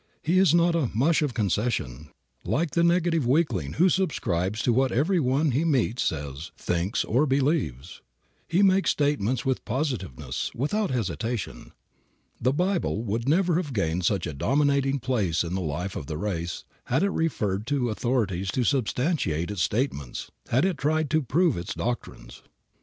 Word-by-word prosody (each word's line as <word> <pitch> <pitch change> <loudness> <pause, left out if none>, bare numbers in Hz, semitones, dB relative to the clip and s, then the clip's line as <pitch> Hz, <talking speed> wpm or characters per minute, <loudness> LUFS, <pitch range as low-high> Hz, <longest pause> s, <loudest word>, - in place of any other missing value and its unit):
He 175 +4 +3
is 190 -5 +5
not 170 +1 +4
a 160 -8 +1
"mush 155 +9 +3
of 145 -5 -1
concession," 95 - -1 0.3
like 155 0 0
the 170 - +2
negative 170 -5 +2
weakling 125 - +1
who 175 +4 +4
subscribes 110 - 0
to 120 - +3
what 130 +1 +2
everyone 145 -1 +2
he 135 +6 +1
meets 130 -6 +1
says, 70 0 -3
thinks 90 +4 -1
or 135 +7 +2
believes. 135 - -1 0.5
He 180 +5 +2
makes 195 0 +4
statements 130 -5 0
with 130 -1 0
positiveness, 95 - -3
without 195 - 0
hesitation. 115 -1 -3 0.7
The 125 - +3
Bible 175 - 0
would 115 +4 -2
never 175 +1 +3
have 155 -7 -3
gained 90 -4 0
such 95 0 +1
a 85 - -4
dominating 140 - +1
place 105 -11 0
in 85 +1 -4
the 95 - -1
life 90 +4 -3
of 70 - -5
the 75 -1 -4
race 85 -2 -3 0.2
had 130 +8 +1
it 200 - +2
referred 105 - -1
to 130 -4 0
authorities 105 -6 -1
to 125 - +1
substantiate 125 - 0
its 100 -4 -3
statements; 80 - -2 0.2
had 130 +8 +3
it 185 -7 -1
tried 155 0 0
to 155 0 +3
prove 160 +5 +2
its 85 +1 -5
doctrines. - - -5
125 Hz, 160 wpm, -26 LUFS, 95-155 Hz, 0.7 s, is